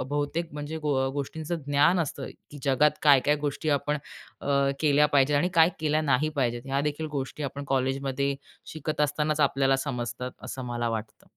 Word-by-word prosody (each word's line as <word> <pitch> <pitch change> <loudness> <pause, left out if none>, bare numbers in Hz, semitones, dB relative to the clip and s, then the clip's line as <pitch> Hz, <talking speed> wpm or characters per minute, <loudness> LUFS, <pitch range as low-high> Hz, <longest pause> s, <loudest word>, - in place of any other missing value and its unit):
बहुतेक 145 +5 -2
म्हणजे 150 +2 -5
गो 140 -3 0
गोष्टींचं 150 +4 -4
ज्ञान 145 +5 +4
असतं, 140 -3 -3 0.2
की 145 - -9
जगात 140 +2 +4
काय-काय 145 0 +5
गोष्टी 145 +1 -3
आपण 145 +1 +1 0.4
अ, - - -8 0.3
केल्या 150 -1 +4
पाहिजेत 145 +1 +4
आणि 150 +5 +2
काय 165 0 +7
केल्या 155 0 +2
नाही 150 0 +2
पाहिजेत, 120 -3 0
ह्या 135 +1 0
देखील 150 +2 -2
गोष्टी 135 +2 -4
आपण 140 0 -4
कॉलेजमध्ये 135 0 0 0.4
शिकत 155 0 -3
असतानाच 150 +1 +1
आपल्याला 135 -2 +3
समजतात, 125 -2 -3
असं 130 0 -6
मला 120 -1 -2
वाटतं. 110 -1 -5
145 Hz, 165 wpm, -27 LUFS, 135-150 Hz, 0.4 s, काय